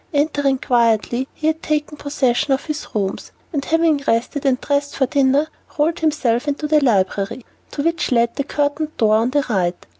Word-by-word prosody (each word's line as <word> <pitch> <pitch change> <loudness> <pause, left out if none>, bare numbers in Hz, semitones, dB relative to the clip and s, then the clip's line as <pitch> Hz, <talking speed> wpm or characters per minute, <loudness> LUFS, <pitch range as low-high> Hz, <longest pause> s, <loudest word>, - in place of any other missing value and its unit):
Entering 285 -2 +1
quietly, 240 +1 +1
he 310 - -7
had 320 +1 +1
taken 300 0 -2
possession 280 -3 0
of 270 - -2
his 305 -1 -4
rooms, 195 -2 -2 0.2
and 285 -2 -1
having 325 -2 +2
rested 250 +5 0
and 255 -2 +2
dressed 285 0 -1
for 270 - +2
dinner, 280 +2 +2 0.3
rolled 315 +3 +1
himself 295 -5 0
into 290 +1 -2
the 300 -1 +3
library, 200 0 0 0.2
to 285 - -4
which 335 -1 0
led 235 -1 +2
the 280 - -1
curtained 290 +2 -2
door 215 -1 +3
on 230 +2 +1
the 285 +1 +1
right. 185 -6 -1
280 Hz, 180 wpm, -20 LUFS, 240-300 Hz, 0.3 s, the